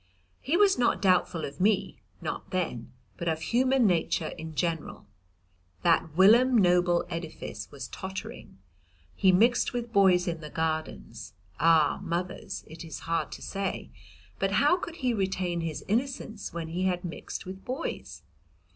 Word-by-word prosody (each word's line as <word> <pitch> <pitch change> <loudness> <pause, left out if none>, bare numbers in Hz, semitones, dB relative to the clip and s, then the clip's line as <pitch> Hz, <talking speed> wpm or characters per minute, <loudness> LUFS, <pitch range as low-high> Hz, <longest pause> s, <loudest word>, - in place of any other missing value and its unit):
He 305 +6 0
was 400 -8 +4
not 240 - +2
doubtful 180 -4 +2
of 140 +4 -8
me, 200 0 +1 0.2
not - - -5
then, 165 - -3 0.3
but 170 - -4
of 160 -1 0
human 255 +6 +2
nature 175 -5 +1
in 160 -1 -8
general; 165 +1 -2 0.8
that 165 -2 +2
whilom 235 +6 +6
noble 175 -3 +3
edifice 165 -2 -6
was 135 -2 -7
tottering. 190 - -7 0.6
He 190 -2 +4
mixed 235 +8 +3
with 240 -1 -4
boys 185 -3 +5
in 165 -1 -2
the 150 - -7
Gardens; 155 - -4 0.3
ah, 160 -1 +4
mothers, 180 0 -4
it 160 +2 -10
is 160 -2 -8
hard 165 0 -1
to - - -9
say, 195 -1 -4 0.5
but 195 0 0
how 290 - +4
could 345 -2 -6
he 245 - +3
retain 185 -4 -1
his 160 -2 -4
innocence 225 -2 -2
when 165 -1 -5
he 180 +3 -1
had 180 -1 0
mixed 170 - -6
with 190 +1 -8
boys? 265 +6 -5
180 Hz, 150 wpm, -28 LUFS, 165-215 Hz, 0.8 s, whilom